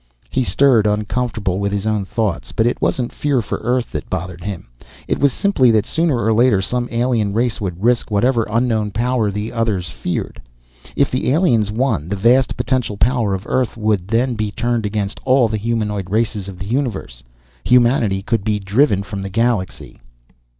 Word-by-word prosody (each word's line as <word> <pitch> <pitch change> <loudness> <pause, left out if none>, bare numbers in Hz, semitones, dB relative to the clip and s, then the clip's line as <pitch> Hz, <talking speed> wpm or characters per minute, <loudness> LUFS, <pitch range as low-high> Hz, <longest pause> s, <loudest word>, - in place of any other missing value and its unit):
He 130 - +1
stirred, 125 -4 +3
uncomfortable 105 -2 -1
with 100 0 -1
his 100 0 -2
own 105 -2 0
thoughts. 105 -4 -2
But 110 - +1
it 120 - 0
wasn't 125 -2 -1
fear 145 -3 0
for 110 - -3
Earth 125 0 -1
that - - -5
bothered 90 -1 -5
him. 100 -3 -6 0.4
It - - -1
was 140 0 +3
simply 150 -10 +2
that 110 -2 +3
sooner 160 -2 +1
or 110 0 +2
later 115 -2 +4
some 120 +5 -2
alien 115 -4 0
race 120 -1 0
would 90 -1 -4
risk 120 0 +2
whatever 115 +2 +1
unknown 110 -2 +1
power 115 +1 0
the 105 +3 -4
others 110 -7 -1
feared. 80 - -4 0.5
If 140 - +2
the 125 - 0
aliens 125 - +2
won, 105 - -1
the 100 - -1
vast 120 +6 +3
potential 125 -6 -1
power 115 -3 +1
of 95 +3 -7
Earth 125 -2 -1
would 105 -4 0
then 120 +4 +1
be 110 -2 -2
turned 115 +1 -1
against 100 -1 -3
all 130 -2 +4
the 110 0 -2
humanoid 105 -3 -2
races 105 -1 -1
of 95 -2 -8
the 95 - -6
universe. 110 - -3 0.4
Humanity 120 -6 +3
could 115 -2 -1
be 105 0 0
driven 100 +1 +2
from 100 0 -6
the 95 - -5
galaxy. 115 -2 -2
110 Hz, 185 wpm, -19 LUFS, 100-125 Hz, 0.5 s, later